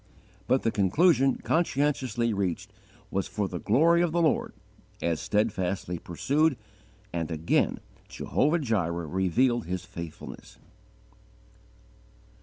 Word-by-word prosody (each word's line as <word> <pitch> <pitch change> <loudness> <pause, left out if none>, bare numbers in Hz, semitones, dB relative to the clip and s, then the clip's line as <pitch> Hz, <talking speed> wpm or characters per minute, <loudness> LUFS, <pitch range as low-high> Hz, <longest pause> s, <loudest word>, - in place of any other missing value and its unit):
But 130 +1 +2
the 115 - +2
conclusion 135 - +3
conscientiously 135 -8 +1
reached 95 -4 -2 0.4
was, 95 - -1
for 105 -2 -2
the 90 -2 -5
glory 165 - +4
of 175 -2 +1
the 170 +1 +1
Lord, 160 - +1 0.5
as 85 -2 -1
steadfastly 95 -4 -1
pursued, 140 - +1 0.6
and 85 -2 -2
again 80 0 +1 0.3
Jehovah 150 +4 +1
Jireh 90 - -1
revealed 95 - +1
His 90 0 -3
faithfulness. 85 -2 -9
105 Hz, 105 wpm, -27 LUFS, 90-140 Hz, 0.6 s, glory